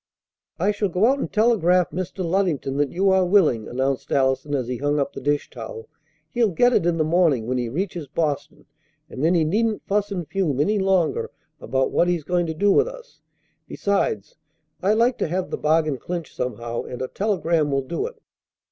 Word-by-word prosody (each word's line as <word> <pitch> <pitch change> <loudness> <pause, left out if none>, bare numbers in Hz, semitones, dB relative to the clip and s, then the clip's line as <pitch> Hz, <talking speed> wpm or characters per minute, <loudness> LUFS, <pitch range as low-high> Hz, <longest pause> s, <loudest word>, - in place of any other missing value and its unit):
"I 195 +5 +2
shall 205 -1 -1
go 180 +4 +2
out 270 +3 +3
and - - -3
telegraph 185 -6 +3
Mr. 185 +2 -4
Luddington 165 -7 0
that 145 -1 +1
you 190 +2 +2
are 190 0 +4
willing," 175 - +3
announced 130 +1 -2
Allison 135 +1 +1
as 130 -4 -2
he 125 0 -3
hung 145 +2 0
up 140 0 -1
the - - -7
dish 145 +1 -1
towel. 115 -2 -8 0.4
"He'll 235 -3 +2
get 245 +8 +3
it 170 - +2
in 170 -1 +1
the 155 - +2
morning 155 -7 +2
when 125 +1 -1
he 120 -1 -2
reaches 170 - -3
Boston, 150 0 -3 0.5
and 130 - -5
then 170 +3 +3
he 165 - +3
needn't 215 +7 0
fuss 205 0 0
and 175 -5 -4
fume 170 -9 -1
any 205 +8 +2
longer 190 - +1 0.3
about 130 0 -1
what 175 - +2
he's 175 -3 0
going 175 +2 0
to 160 - -3
do 205 +5 +3
with - - +4
us. - - -11 0.5
Besides, 440 - -1 0.4
I 195 +3 +3
like 235 +3 +2
to - - 0
have 180 +3 -3
the - - -2
bargain 155 -3 +1
clinched 170 +1 -6
somehow, 120 -1 -3
and 125 - -8
a - - -2
telegram 170 -6 0
will 135 -1 0
do 170 - -3
it." - - -12
170 Hz, 200 wpm, -23 LUFS, 140-200 Hz, 0.5 s, are